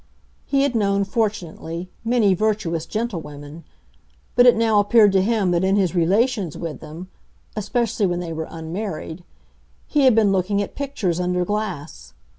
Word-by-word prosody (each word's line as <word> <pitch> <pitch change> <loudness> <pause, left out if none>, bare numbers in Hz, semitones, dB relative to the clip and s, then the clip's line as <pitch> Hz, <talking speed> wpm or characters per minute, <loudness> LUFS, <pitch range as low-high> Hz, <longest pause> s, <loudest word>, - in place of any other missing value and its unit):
He 275 -1 +2
had 280 -2 +1
known, 200 -3 +1
fortunately, 185 -5 -3 0.2
many 225 -4 +3
virtuous 185 -5 -1
gentlewomen, 160 -8 -5 0.7
but 245 - +6
it 245 - +7
now 225 -2 +3
appeared 205 0 +5
to 190 -1 +3
him 205 -2 +1
that 175 +1 +1
in 190 +1 +2
his 190 -4 +1
relations 195 - +1
with 165 -3 -5
them 165 +4 -10 0.5
(especially 215 0 0
when 175 -1 -1
they 170 -2 -5
were 160 0 -4
unmarried) 165 0 -6 0.6
he 290 -3 +2
had 255 -4 +6
been 215 -3 +4
looking 195 +1 +1
at 200 - -3
pictures 225 -12 -2
under 180 0 0
glass. 170 - -5
195 Hz, 155 wpm, -22 LUFS, 170-220 Hz, 0.7 s, it